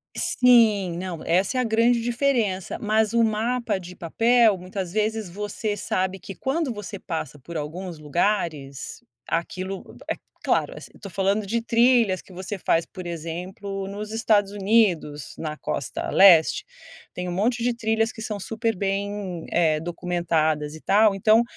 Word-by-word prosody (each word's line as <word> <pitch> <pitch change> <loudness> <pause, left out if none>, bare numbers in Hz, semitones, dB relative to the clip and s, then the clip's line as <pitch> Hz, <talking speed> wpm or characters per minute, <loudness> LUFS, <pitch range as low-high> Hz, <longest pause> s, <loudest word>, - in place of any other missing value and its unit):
Sim, 215 -8 +4
não, 180 -2 -5
essa 190 +9 +2
é - - +3
a - - +1
grande 230 +1 +3
diferença. 235 -6 0
Mas 215 0 +1
o 235 -1 +4
mapa 225 0 0
de 180 0 -10
papel 225 +4 +3
muitas 185 0 -5
vezes 215 -2 -1
você 205 +2 -3
sabe 190 0 -1
que 195 - -8
quando 275 -1 -1
você 210 -1 -7
passa 160 -5 -5
por 170 +5 -11
alguns 165 +2 -6
lugares, 150 -4 -2 0.2
aquilo, 185 +3 -4
é - - 0 0.3
claro, - - +1
assi - - -10
eu - - -17
estou 200 - -9
falando 195 +3 +1
de 230 +4 -1
trilhas 235 -4 +3
que - - -19
você 190 +3 -5
faz, 165 -2 +1
por 185 - -9
exemplo, 180 +4 -5
nos 210 +2 -6
Estados 215 -3 +2
Unidos, 195 - +1
na 155 -1 -4
costa 140 - -3
leste, 175 -5 +6 0.5
tem 180 0 -4
um 180 - -3
monte 230 +6 0
de 245 0 +2
trilhas 225 -1 0
que 220 - -10
são 210 -2 -4
super 225 +2 -2
bem, 195 -2 -3
eh, 160 -3 +3
documentadas 165 -3 -1
e 155 - -10
tal. 210 +1 +4
Então 215 +4 +4
195 Hz, 160 wpm, -24 LUFS, 175-220 Hz, 0.5 s, leste